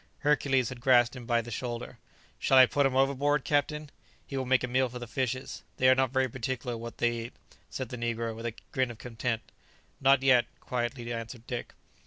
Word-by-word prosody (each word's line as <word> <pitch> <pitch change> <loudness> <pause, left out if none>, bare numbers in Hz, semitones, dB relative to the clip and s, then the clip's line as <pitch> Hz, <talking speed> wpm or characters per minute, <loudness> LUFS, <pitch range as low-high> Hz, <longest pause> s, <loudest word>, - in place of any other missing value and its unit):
Hercules 135 -4 +2
had 125 -1 -8
grasped 120 -1 +4
him 120 -2 -9
by 120 -1 +2
the 120 - -9
shoulder. 120 +1 -5 0.4
"Shall 135 - +4
I 130 - +10
put 140 +2 +2
him 130 - -3
overboard, 140 +2 +2
captain? 150 0 0 0.3
he 140 - -7
will 130 -1 -2
make 130 0 +3
a - - 0
meal 130 +1 +1
for 125 - -7
the 120 - -6
fishes; 130 +2 -3 0.2
they 130 - +4
are - - +8
not 130 0 +2
very 130 +1 +1
particular 125 0 -3
what 115 +1 -7
they 120 - +2
eat," 120 - -9 0.4
said 130 -3 -5
the 125 - -6
negro, 115 -1 -2
with 115 +1 -4
a 115 - -5 0.2
grin 130 -4 +1
of 120 - -8
contempt. 115 -1 -4 0.5
"Not 135 0 +4
yet," 125 -3 +5
quietly 120 -1 -3
answered 115 0 -7
Dick. 120 -1 -5
125 Hz, 210 wpm, -29 LUFS, 120-130 Hz, 0.5 s, I